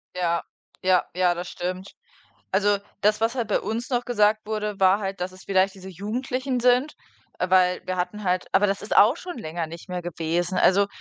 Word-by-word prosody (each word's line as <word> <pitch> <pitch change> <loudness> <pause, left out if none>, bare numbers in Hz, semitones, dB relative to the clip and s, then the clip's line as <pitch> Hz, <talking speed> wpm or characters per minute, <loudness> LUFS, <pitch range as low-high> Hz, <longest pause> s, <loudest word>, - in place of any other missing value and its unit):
Ja, 170 -2 0 0.4
ja, 185 -1 +3
ja, 180 -1 +3
das 175 +1 -5
stimmt. 185 +2 -5 0.6
Also, 205 +1 +3 0.2
das, 210 +1 +3
was 230 +3 +1
halt 235 -4 -1
bei - - +2
uns 225 +5 -3
noch 245 -1 0
gesagt 215 -2 +2
wurde, 210 -1 -3
war 190 +2 +5
halt, 195 -2 -4
dass 185 +1 -2
es 185 0 -14
vielleicht 190 0 +2
diese 190 0 -10
Jugendlichen 250 +7 -3
sind, 250 +4 +3 0.4
äh, 180 - -1
weil 180 -1 +3
wir 185 0 -3
hatten 210 +4 -3
halt 180 -1 0
aber 200 +2 +4
das 195 0 -1
ist 210 - -3
auch 235 +10 +6
schon 360 -4 -7
länger 165 -5 -4
nicht 170 +2 -11
mehr 180 -1 -3
gewesen. 175 +2 -2
Also, 200 +2 +4
195 Hz, 200 wpm, -24 LUFS, 180-215 Hz, 0.6 s, auch